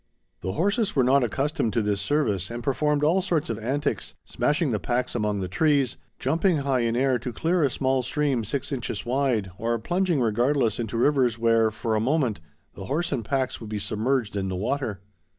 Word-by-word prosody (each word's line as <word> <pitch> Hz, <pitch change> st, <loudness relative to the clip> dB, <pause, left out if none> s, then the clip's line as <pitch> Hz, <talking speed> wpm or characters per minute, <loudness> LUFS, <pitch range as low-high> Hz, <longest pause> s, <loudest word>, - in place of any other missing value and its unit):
The 95 Hz, +1 st, -3 dB
horses 205 Hz, +5 st, 0 dB
were 135 Hz, -, +4 dB
not 135 Hz, +2 st, +4 dB
accustomed 135 Hz, -, -1 dB
to 115 Hz, -, +1 dB
this 105 Hz, -1 st, 0 dB
service 105 Hz, -, 0 dB
and 120 Hz, 0 st, -6 dB
performed 150 Hz, +3 st, +1 dB
all 170 Hz, +6 st, +3 dB
sorts 170 Hz, -8 st, -1 dB
of 110 Hz, -, -4 dB
antics, 140 Hz, +6 st, -2 dB
smashing 150 Hz, -1 st, 0 dB
the 105 Hz, -, 0 dB
packs 125 Hz, +3 st, -1 dB
among 105 Hz, -3 st, -1 dB
the 95 Hz, -, -2 dB
trees, 140 Hz, -, +2 dB, 0.2 s
jumping 165 Hz, +6 st, +1 dB
high 135 Hz, -2 st, +2 dB
in 115 Hz, -1 st, 0 dB
air 130 Hz, 0 st, +2 dB
to 120 Hz, +1 st, -5 dB
clear 170 Hz, +8 st, 0 dB
a 140 Hz, -, +3 dB
small 130 Hz, 0 st, +1 dB
stream 135 Hz, -1 st, 0 dB
six 135 Hz, +7 st, -3 dB
inches 120 Hz, -6 st, -4 dB
wide, 120 Hz, -6 st, 0 dB
or 115 Hz, +1 st, 0 dB
plunging 175 Hz, -, 0 dB
regardless 120 Hz, +1 st, +1 dB
into 115 Hz, 0 st, -3 dB
rivers 125 Hz, -2 st, +2 dB
where, 115 Hz, -1 st, +3 dB
for 110 Hz, +1 st, -3 dB
a -, -, +2 dB
moment, 125 Hz, -, +1 dB, 0.3 s
the 95 Hz, -, -8 dB
horse 160 Hz, -, -1 dB
and 130 Hz, -5 st, -1 dB
packs 130 Hz, +3 st, -1 dB
would 110 Hz, -, -7 dB
be 105 Hz, -, -3 dB
submerged 110 Hz, +2 st, -1 dB
in 95 Hz, -1 st, -1 dB
the 95 Hz, -, -3 dB
water. 110 Hz, -1 st, -2 dB
125 Hz, 200 wpm, -25 LUFS, 110-145 Hz, 0.3 s, were